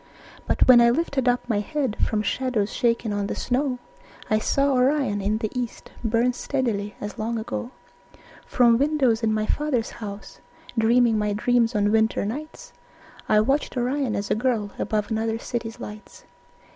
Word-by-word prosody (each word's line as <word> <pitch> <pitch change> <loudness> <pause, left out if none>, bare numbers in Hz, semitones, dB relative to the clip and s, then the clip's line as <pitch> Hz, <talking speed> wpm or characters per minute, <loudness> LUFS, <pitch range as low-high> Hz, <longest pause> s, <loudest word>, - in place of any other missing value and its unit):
But - - +2
when 245 -2 +8
I 235 - +6
lifted 270 -1 0
up 245 0 +1
my 220 -4 +1
head 265 0 -2
From 215 -1 0
shadows 240 -4 -1
shaken 230 -2 0
on 205 -1 -1
the - - -3
snow, 255 0 -1 0.5
I 215 - +4
saw 275 +5 +1
Orion 255 -5 +2
in 205 +2 0
the 215 -1 -3
east 245 -2 -5
Burn 235 +2 +2
steadily 230 -7 -2
as 205 0 -7
long 230 +2 -2
ago. 225 +2 -4 0.8
From 235 -2 +4
windows 275 -6 +2
in 225 -1 +1
my 215 0 0
father's 270 -3 -1
house, 205 -2 -9 0.4
Dreaming 230 0 +3
my 210 -1 0
dreams 235 +2 +1
on 205 0 +2
winter 220 -1 +2
nights, 310 - -7 0.6
I 210 0 +5
watched 270 +3 0
Orion 255 0 0
as 200 0 -3
a - - +3
girl 220 -3 -1
Above 215 0 -1
another 225 0 -1
city's 230 -1 -5
lights. 210 +1 -10
230 Hz, 165 wpm, -24 LUFS, 215-255 Hz, 0.8 s, when